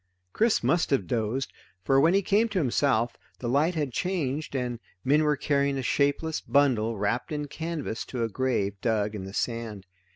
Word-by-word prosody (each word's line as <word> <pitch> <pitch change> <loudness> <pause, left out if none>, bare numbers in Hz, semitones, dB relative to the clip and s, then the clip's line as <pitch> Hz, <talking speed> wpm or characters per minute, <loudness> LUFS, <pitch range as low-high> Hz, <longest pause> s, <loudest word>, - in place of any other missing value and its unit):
Chris 225 0 +2
must 170 0 +2
have 135 - +1
dozed, 120 +2 -2 0.3
for 135 +6 +4
when 165 +5 +4
he 200 - +3
came 215 +5 +2
to 210 - -3
himself 125 -5 +1 0.2
the 120 - -5
light 150 +8 +2
had 145 -5 -2
changed, 155 -5 -2
and 125 -2 -2 0.3
men 145 +4 +4
were 150 -1 +2
carrying 140 -1 +1
a 135 - -2
shapeless 145 +5 +1
bundle 120 -6 +2
wrapped 105 +8 -1
in 150 -1 -2
canvas 160 -6 -4
to 125 -3 -3
a - - +1
grave 115 -4 0
dug 105 -3 0
in 100 -3 -5
the 95 - -7
sand. 115 -5 -3
135 Hz, 185 wpm, -27 LUFS, 115-155 Hz, 0.3 s, for